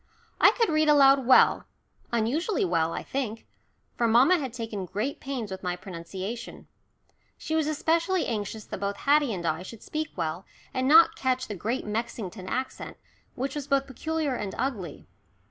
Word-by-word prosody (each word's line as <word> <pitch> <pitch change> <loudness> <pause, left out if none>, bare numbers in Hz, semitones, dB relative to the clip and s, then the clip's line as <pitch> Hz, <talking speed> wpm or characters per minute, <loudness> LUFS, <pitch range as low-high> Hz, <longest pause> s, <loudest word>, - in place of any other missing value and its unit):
I - - +8
could 460 -3 +1
read 310 -1 +2
aloud 275 -3 +6
well, 260 - +5 0.5
unusually 265 - 0
well, 165 -2 +1
I - - -4
think, 230 -5 -4 0.5
for 235 - +1
mamma 260 +11 +5
had 265 -4 -4
taken 225 -5 -5
great 215 +10 -3
pains 255 -7 -5
with 190 - -6
my 180 -1 -2
pronunciation. 190 +5 -7 0.7
She 315 - -5
was 315 -2 +1
especially 330 +4 +1
anxious 215 -1 -4
that - - -6
both 200 +1 -2
Haddie 290 -2 +3
and 180 -4 -4
I 160 +1 0
should 210 +4 -10
speak 310 -1 -3
well, 165 +1 -3 0.3
and 260 0 0
not 325 +3 +7
catch 255 -1 -1
the 210 - -4
Great 230 +8 -3
Mexington 210 -3 -4
accent, 260 +5 -4 0.4
which 270 +2 -3
was 290 -2 -5
both 275 -1 +2
peculiar 310 +2 -2
and 205 -5 -4
ugly. 220 - -4
240 Hz, 165 wpm, -27 LUFS, 200-285 Hz, 0.7 s, I